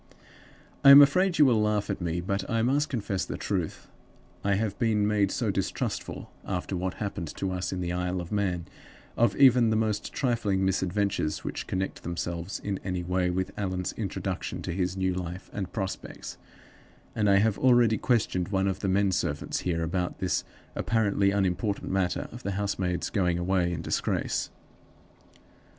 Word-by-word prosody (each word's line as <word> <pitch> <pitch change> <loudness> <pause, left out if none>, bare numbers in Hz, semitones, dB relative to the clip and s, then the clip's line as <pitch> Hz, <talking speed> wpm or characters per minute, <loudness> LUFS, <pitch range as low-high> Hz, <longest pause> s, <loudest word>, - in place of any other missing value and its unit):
"I 140 - +9
am 140 +1 +12
afraid 175 +6 +5
you 150 - +7
will 115 -5 +4
laugh 105 -1 +1
at 95 - -4
me, 85 0 -1
but 95 +1 -2
I 115 -1 +1
must 145 +5 +2
confess 100 -6 -2
the - - -5
truth. - - -3 0.6
I 100 0 +2
have 105 -1 -1
been 110 -3 +2
made 105 -2 +2
so - - 0
distrustful - - -3
(after 95 0 -3
what 90 +1 -2
happened 100 -5 -4
to 95 - -2
us 90 0 -2
in 95 -1 -3
the 85 -1 -2
Isle 90 +1 -1
of 85 -1 -7
Man) 95 -5 -1 0.5
of 115 -4 +3
even 125 -4 +6
the 110 - +2
most 110 -1 -1
trifling 110 -7 0
misadventures 95 -3 0
which - - -5
connect 95 +1 -3
themselves 85 +1 -4
in 100 -2 -2
any 90 -2 -2
way 90 0 0
with 95 +1 -1
Allan's 95 -3 -2
introduction - - -4
to - - -3
his 90 0 -1
new 95 -1 +1
life 90 0 -6
and 95 -3 -4
prospects, 95 -3 -5 0.7
that 105 -2 +1
I 100 -1 +5
have 105 +1 +2
already 120 -4 +4
questioned 105 -7 +1
one 95 -1 +1
of 95 0 -1
the 100 - -1
men 100 +1 +3
servants 90 - -1
here 85 -2 -1
about 90 +2 -2
this 95 -2 0 0.3
apparently 100 -3 +2
unimportant 100 +1 -1
matter 95 -2 0
of 120 - -9
the 100 -4 -3
housemaid's 95 -3 -1
going 90 -4 +1
away 90 0 +1
in 80 -2 -4
disgrace. - - -1
95 Hz, 170 wpm, -28 LUFS, 90-105 Hz, 0.7 s, am